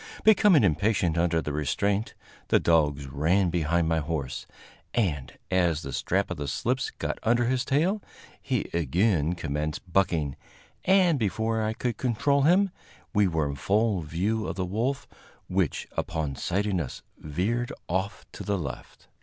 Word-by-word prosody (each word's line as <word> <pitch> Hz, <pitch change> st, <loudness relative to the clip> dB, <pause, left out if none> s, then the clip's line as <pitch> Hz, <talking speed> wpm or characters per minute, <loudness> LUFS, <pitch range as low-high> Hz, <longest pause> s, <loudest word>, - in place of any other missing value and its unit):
Becoming 205 Hz, -, +6 dB
impatient 90 Hz, 0 st, +2 dB
under 85 Hz, -1 st, +1 dB
the 75 Hz, -, -3 dB
restraint, 100 Hz, +8 st, 0 dB, 0.3 s
the -, -, +4 dB
dogs 75 Hz, -4 st, +2 dB
ran 85 Hz, +7 st, +1 dB
behind 85 Hz, 0 st, +1 dB
my 80 Hz, 0 st, +2 dB
horse, 75 Hz, -3 st, -4 dB, 0.5 s
and, 75 Hz, -, 0 dB, 0.2 s
as 85 Hz, -4 st, +2 dB
the 70 Hz, -, -6 dB
strap 95 Hz, +1 st, 0 dB
of 90 Hz, -, -3 dB
the 70 Hz, 0 st, -4 dB
slips -, -, -1 dB
got -, -, -4 dB
under 120 Hz, +1 st, +2 dB
his 125 Hz, +1 st, +1 dB
tail, 165 Hz, +10 st, +1 dB, 0.4 s
he -, -, -1 dB
again 85 Hz, -, +1 dB
commenced 75 Hz, +2 st, -4 dB
bucking, 80 Hz, -8 st, +1 dB, 0.5 s
and 185 Hz, -5 st, +4 dB
before 110 Hz, +2 st, 0 dB
I 110 Hz, 0 st, 0 dB
could 120 Hz, -1 st, -2 dB
control 130 Hz, +4 st, +1 dB
him 185 Hz, +6 st, +4 dB, 0.4 s
we 105 Hz, -2 st, +4 dB
were 80 Hz, -4 st, 0 dB
in 70 Hz, -, -3 dB
full 100 Hz, -, +1 dB
view 95 Hz, +8 st, -1 dB
of -, -, -3 dB
the 95 Hz, -1 st, -1 dB
wolf, 120 Hz, +9 st, -2 dB, 0.4 s
which, 90 Hz, -4 st, 0 dB
upon 80 Hz, -4 st, -2 dB
sighting 95 Hz, +4 st, 0 dB
us, 70 Hz, -, -7 dB, 0.2 s
veered 105 Hz, +11 st, -1 dB, 0.2 s
off 95 Hz, +4 st, -2 dB
to -, -, -8 dB
the 100 Hz, -1 st, 0 dB
left. 70 Hz, -7 st, -7 dB
90 Hz, 155 wpm, -27 LUFS, 80-110 Hz, 0.5 s, Becoming